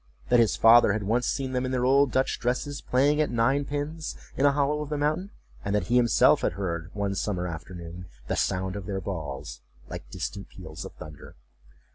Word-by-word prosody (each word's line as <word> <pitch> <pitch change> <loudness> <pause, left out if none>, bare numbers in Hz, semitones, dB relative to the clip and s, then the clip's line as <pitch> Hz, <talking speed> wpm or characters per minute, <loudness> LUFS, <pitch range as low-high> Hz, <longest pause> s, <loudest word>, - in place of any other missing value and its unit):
That 120 - +5
his 115 -2 +3
father 115 -2 +6
had 110 -1 -2
once 115 +5 +1
seen 135 -1 -2
them 125 0 -1
in 130 - -2
their 125 -1 0
old 135 0 +4
Dutch 130 0 0
dresses 135 +4 -2
playing 145 +4 +2
at 150 - +1
nine 135 +5 +1
pins 150 +3 -4 0.2
in 140 - +3
a - - +5
hollow 145 +1 0
of 150 - -5
the 150 - -2
mountain; 155 +7 0 0.3
and 100 +1 -1
that 100 -4 -1
he - - +5
himself 120 -2 +5
had - - 0
heard, 85 -4 -4
one 100 -1 -1
summer 95 -2 -2
afternoon, 85 +1 -8 0.2
the - - -2
sound 95 0 -1
of 100 -1 -6
their 100 -2 -2
balls, 75 -7 -6 0.3
like - - -8
distant - - -5
peals - - -9
of - - -9
thunder. 75 -2 -11
120 Hz, 205 wpm, -27 LUFS, 95-140 Hz, 0.3 s, father